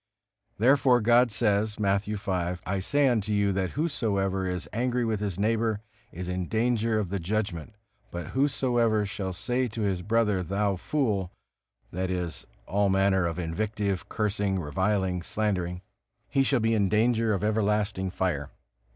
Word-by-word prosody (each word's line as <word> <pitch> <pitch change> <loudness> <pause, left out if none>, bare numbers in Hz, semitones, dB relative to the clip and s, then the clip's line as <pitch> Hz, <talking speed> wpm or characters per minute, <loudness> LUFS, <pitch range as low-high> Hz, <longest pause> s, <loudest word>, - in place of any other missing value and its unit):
Therefore 125 +2 +4
God 120 +2 +4
says, 105 -1 +1
Matthew 100 +1 0
v, 100 - -4
"I 90 +2 -2
say 145 +9 +2
unto 110 -4 +1
you, 100 -1 +2
that 95 +4 -2
whosoever 100 - 0
is 90 -1 -3
angry 125 +1 0
with 110 -2 -1
his 100 -3 -3
neighbor, 110 0 +1 0.3
is 90 +1 -6
in 90 -1 -2
danger 115 -1 +1
of 105 -4 -1
the 100 +1 -2
judgment; 100 0 -3 0.3
but 85 -3 -6
whosoever 120 -6 +1
shall 100 -2 -4
say 125 +8 -1
to 110 0 -5
his 95 -3 0
brother, 105 -1 +1
Thou 100 +2 0
fool 100 - -1 0.6
(that 90 +1 -2
is, 90 -3 -3 0.2
all 100 +1 +1
manner 95 -2 +3
of 85 - -4
invective, 100 +2 -2
cursing, 100 -2 0
reviling, 95 +3 0
slandering), 90 -2 -2 0.4
he 135 - +1
shall 135 -2 +2
be 115 +1 +2
in 100 -3 +2
danger 115 +1 +2
of 100 - -3
everlasting 105 -2 0
fire." 90 -6 -2
105 Hz, 150 wpm, -27 LUFS, 95-115 Hz, 0.6 s, Therefore